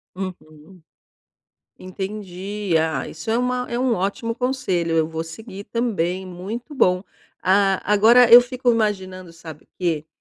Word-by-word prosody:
Uhum. 180 -2 -9 1.0
Entendi. 195 0 -5
Ah, 160 0 -1
isso 160 +8 -7
é 230 - +2
uma 250 0 -1
é 240 - -2
um 255 -1 +1
ótimo 200 +4 -2
conselho, 210 -11 -1
eu 160 -1 +2
vou 160 0 -4
seguir 200 +4 -10
também, 190 -6 -2
muito 210 - -7
bom. 180 -7 +2 0.4
Ah, 195 0 +3
agora 230 +4 +6
eu 240 - +12
fico 250 0 -1
imaginando 190 -5 -2
sabe 160 -2 -12
quê? 160 -4 -1
190 Hz, 135 wpm, -22 LUFS, 175-230 Hz, 1.0 s, eu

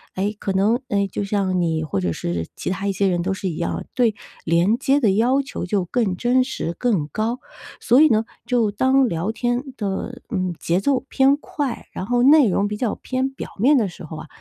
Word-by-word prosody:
哎， 200 +2 -1
可 195 - -2
能， 205 +5 +2
哎， 200 -1 +1
就 - - -2
像 195 -2 0
你 160 -2 0
或 135 -11 -2
者 90 -2 0
是 85 0 -3
其 - - -4
他 195 +2 -2
一 - - +2
些 195 +1 +1
人 175 -2 +1
都 195 +3 -1
是 190 0 -4
一 160 - -5
样， 170 - -3
对 235 -4 +2 0.3
连 175 +7 +2
接 275 +2 +2
的 220 -7 +3
要 245 +7 +3
求 275 -8 -6
就 190 0 0
更 205 -1 0
真 250 +5 +2
实、 210 -9 -4
更 205 -12 0
高。 220 - -2 0.4
所 245 +4 +4
以 315 - +8
呢， 220 -2 +2 0.2
就 235 -4 +1
当 260 +5 +3
聊 170 +3 -2
天 240 +2 -1
的， 210 +4 -4
嗯， 185 -6 -1
节 170 +2 +1
奏 265 +6 +1
偏 275 +1 +4
快， 285 -4 -4
然 185 - -5
后 245 +3 +1
内 285 -1 +7
容 200 +2 +1
比 210 0 -4
较 225 -1 -1
偏 260 +1 -2
表 270 - -8
面 275 +7 +5
的 220 -5 +2
时 175 - -10
候 155 0 -8
啊， 155 - -9
210 Hz, 235 characters per minute, -22 LUFS, 185-250 Hz, 0.4 s, 以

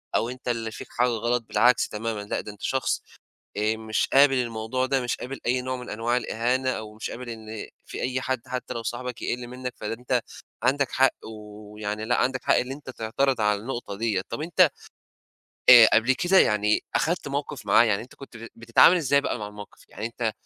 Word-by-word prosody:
أو 115 - +1
أنت 125 0 -9
اللي 115 -2 -2
فيك - - -9
حاجة 125 +1 +1
غلط 120 +1 0
بالعكس 125 0 +3
تمامًا، 110 0 -4
لأ، 100 - -3
ده 105 - -8
أنت 105 - -17
شخص 130 -1 -1 0.6
آآ 110 +1 +1
مش 110 0 -1
قابل 140 0 +6
الموضوع 120 0 -1
ده 135 0 +1
مش 120 -1 -1
قابل 135 +2 -7
أي 125 +1 +1
نوع 130 0 -3
من 125 - -9
أنواع 115 +3 0
الإهانة 125 +3 0
أو 110 -4 -4
مش 110 - -5
قابل 125 0 -7
إن 110 -1 -7 0.2
في - - -7
أي 130 0 -1
حد 130 -2 -2
حتّى 125 0 -4
لو 115 - -5
صاحبك 120 +1 -5
يقِل 120 0 -3
منّك 125 0 -6
فده 105 - -4
أنت 125 +1 -1 0.4
عَندك 135 +1 +2
حق 135 0 +4
ويعني 105 0 -7
لأ، 120 - +2
عَندك 130 0 0
حق - - +3
اللي 130 +2 -1
أنت 140 -1 -11
تعترض 125 +1 -1
على 105 -1 +2
النقطة 120 -4 -5
دِيّة. 110 -4 0
طَب 115 - -4
أنت 165 +1 +4 1.0
آآ 120 -3 +10
قبل 115 +4 +4
كده 180 +7 +2
يعني 105 0 +3 0.2
أخدت 170 -1 0
مَوقِف 140 -5 -4
معاه، 105 +3 +6
يعني 105 -4 +1
أنت 125 - -13
كنت 135 -4 -12
ب 115 - -9
بتتعامل 115 +9 +5
إزاي 140 -4 +2
بقى 130 - -2
مع 105 - -5
المَوقِف؟ 105 -1 -12
يعني 110 - -6
أنت 115 -1 -2
120 Hz, 205 wpm, -25 LUFS, 110-130 Hz, 1.0 s, آآ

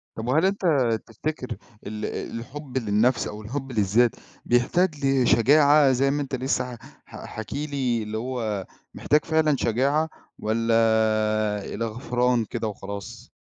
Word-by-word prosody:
طَب 110 +1 -5
وهل 155 +8 +3
أنت 195 0 0 0.4
تفتكر 125 +4 -5 0.4
ال 105 +1 -4 0.3
الحب 135 +2 -7
للنَفس 115 +1 +2
أو 105 +1 -7
الحب 135 +5 -5
للذات، 110 +2 +2 0.3
بيحتاج 145 +5 +1
لشجاعة 135 +2 +5
زي 135 +2 +2
ما 145 +1 -1
أنت 135 -1 -3
لسه 125 -1 -2
ح - - -14 0.3
ح - - -10
حاكي 110 +7 -5
لي 130 -6 -1
اللي 105 +1 -4
هو 110 -5 -3 0.3
محتاج 150 +1 +1
فعلًا 160 -2 +2
شجاعة، 140 +7 +1 0.3
والَّا 115 +2 -1
آآ، 110 -2 +2
إلى 115 - -2
غفران 120 +1 0
كده 115 0 -3
وخلاص؟ 100 -2 -8
120 Hz, 140 wpm, -25 LUFS, 110-140 Hz, 0.4 s, لشجاعة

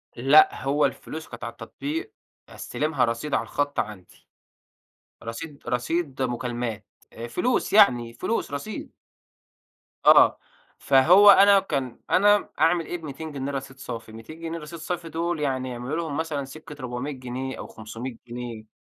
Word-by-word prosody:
لأ، 135 +6 +5
هو 145 +2 +2
الفلوس 160 +1 -5
كانت - - -10
على - - -4
التطبيق، 330 +9 -6 0.4
أستلِمها 150 -4 -1
رصيد 115 +5 -3
على - - +2
الخَطّ 145 0 -2
عندي. 100 -4 -6 1.0
رصيد 140 +6 -7
رصيد 135 +3 -1
مكالمات، 120 -3 -3 0.3
آآ، 115 +1 -7
فلوس 240 - 0
يعني، 120 - +5
فلوس، 220 - -2
رصيد. 145 +10 -6 1.1
آه. - - +7 0.4
فهو 175 +10 +7
أنا 200 0 +7
كان 135 -10 -3
أنا 205 +2 +4
أعمَل 165 +2 +3
إيه، 175 - -4
ب200 155 -1 -7
جنيه 140 -1 -4
رصيد 135 -1 -6
صافي؟ 115 -4 -7
200 115 +9 -11
جنيه 165 0 -4
رصيد 155 +2 -9
صافي 170 0 -4
دول 165 +1 -2
يعني 130 -3 -1
يعملوا 125 +4 -4
لهُم 160 -4 -3
مثلًا 155 -4 -2
سكَّة 150 +2 -11
400 125 +3 -4
جنيه 130 0 -5
أو - - -7
500 115 +3 -8
جنيه. 120 -2 -7
140 Hz, 145 wpm, -25 LUFS, 125-165 Hz, 1.1 s, آه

